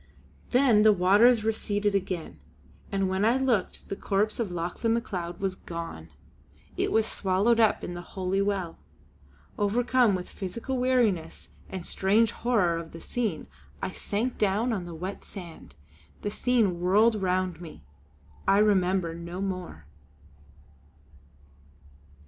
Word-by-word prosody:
Then 250 -4 +4
the 215 0 +7
waters 210 +5 +5
receded 210 -2 0
again, 180 - -3 0.5
and 195 -1 +1
when 190 +1 0
I 230 +4 +4
looked, 250 -8 0
the 195 - -4
corpse 205 +3 -1
of 225 -4 -1
Lauchlane 175 +7 -1
Macleod 175 -7 -4
was 195 -1 -1
gone. 165 - -7 0.7
It - - 0
was 220 -1 +3
swallowed 205 +3 +1
up 220 -2 +3
in 175 - -4
the 175 - -6
Holy 190 +2 -2
Well. 195 -4 -2 0.8
Overcome 235 +1 +3
with 180 -1 -5
physical 230 +7 -5
weariness 235 -10 0 0.2
and 185 -2 -6
strange 210 +4 +2
horror 210 -9 +1
of 165 -1 -9
the 165 - -8
scene 215 -9 -3 0.3
I - - -3
sank 220 +6 -3
down 215 +4 +1
on 190 -5 -3
the 170 -1 -8
wet 185 +5 -6
sand. 175 -5 -11 0.5
The 205 - -2
scene 220 -8 +1
whirled 210 +4 +3
round 185 -2 0
me.... 155 - -10 0.6
I 195 - +5
remember 190 -4 +2
no 170 +2 -7
more. 185 - -5
195 Hz, 135 wpm, -27 LUFS, 180-220 Hz, 0.8 s, the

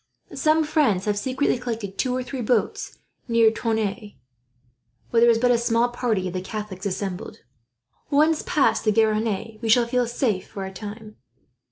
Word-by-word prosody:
Some 315 +1 +2
friends 280 - +1
have 210 -1 +1
secretly 255 +4 0
collected 225 -5 -5
two 255 -1 0
or 255 - -2
three 260 0 -5
boats 230 -1 -1 0.3
near 230 -2 +4
Tonneins, 220 -2 -2 1.0
where 230 - +3
there 235 - +6
is 230 - +4
but 245 +2 +3
a 240 - +3
small 235 +1 +2
part 240 -2 -1
of 185 -2 -3
the 185 - -3
Catholics 205 -1 -5
assembled. 190 -1 -5 0.7
Once 305 +2 +3
past 225 -7 +2
the 215 - +3
Garonne, 220 0 0
we 230 - -2
shall 235 +2 +5
feel 245 +1 0
safe 230 -5 -1
for 195 -1 -6
a 190 - -8
time." 215 +2 -9
225 Hz, 170 wpm, -24 LUFS, 210-245 Hz, 1.0 s, there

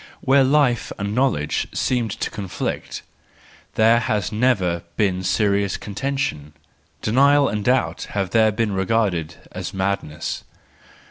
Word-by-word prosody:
Where 135 +1 +4
life 130 -3 +2
and 100 0 -3
knowledge 110 - 0
seemed 120 -3 0
to - - -1
con¬ 105 -2 -5
flict, - - -4 0.7
there 115 +2 +5
has 105 -4 -1
never 105 -7 +1 0.2
been 95 -3 +1
serious 100 +1 +1
contention; 105 - -3 0.5
denial 140 +5 +4
and 105 -1 -2
doubt 125 +3 +1
have 95 -3 -1
there 110 -1 +4
been 110 0 -1
regarded 95 -4 0 0.2
as - - -6
madness. 95 -5 -3
105 Hz, 125 wpm, -22 LUFS, 95-125 Hz, 0.7 s, there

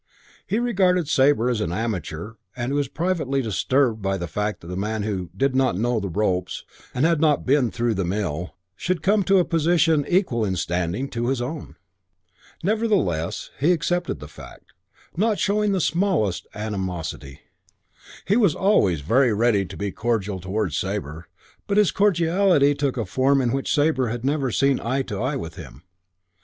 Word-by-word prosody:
He 210 - 0
regarded 185 -8 +2
Sabre 135 -4 +3
as 120 -3 0
an 85 - -2
amateur 100 -2 -4 0.2
and 120 +1 -3
he - - -1
was 145 -1 0
privately 160 -4 -1
disturbed 120 +1 +1
by 95 0 -1
the 85 - -4
fact 105 +6 -3
that 85 - -9
a - - -4
man 105 +2 -2
who 95 -5 -3
"did 135 +3 +1
not 130 -7 +2
know 120 +2 +1
the 100 -2 -4
ropes" 90 -1 -1 0.3
and 130 +5 +1
had 165 -2 +2
not 150 -3 +2
"been 130 -2 +3
through 120 0 -1
the 95 - -1
mill" 90 -3 -3 0.2
should 180 -3 -2
come 205 +3 +3
to 195 +1 +4
a 180 - +3
position 165 -2 +2
equal 175 - +1
in 95 -3 -1
standing 90 +8 -2
to 120 -2 -2
his 135 -1 0
own. 140 +5 -5 0.9
Nevertheless 195 - 0
he 155 +6 +3
accepted 175 +2 -1
the 75 - -9
fact, 75 - -14 0.6
showing 210 +1 +1
not - - +1
the 185 - 0
smallest 165 - 0
animosity. 90 -9 -5 0.8
He 200 - +2
was 200 -10 +3
always 100 - +2
very 120 - +3
ready 105 -2 +2
to 95 +2 -10
be 100 -1 -3
cordial 105 -3 -2
towards 95 -2 -2
Sabre; 85 -4 -4 0.4
but 200 - 0
his 210 -3 +4
cordiality 175 -5 +3
took 140 -2 -2
a 115 - -1
form 135 +8 +2
in 125 -3 +1
which 135 +1 -2
Sabre 145 -4 +2
had 120 +2 -4
never 140 -1 0
seen 135 +3 +2
eye 130 +4 -1
to 105 -5 -5
eye 135 +4 -1
with 85 -4 -6
him. 70 +7 -11
125 Hz, 175 wpm, -23 LUFS, 100-160 Hz, 0.9 s, to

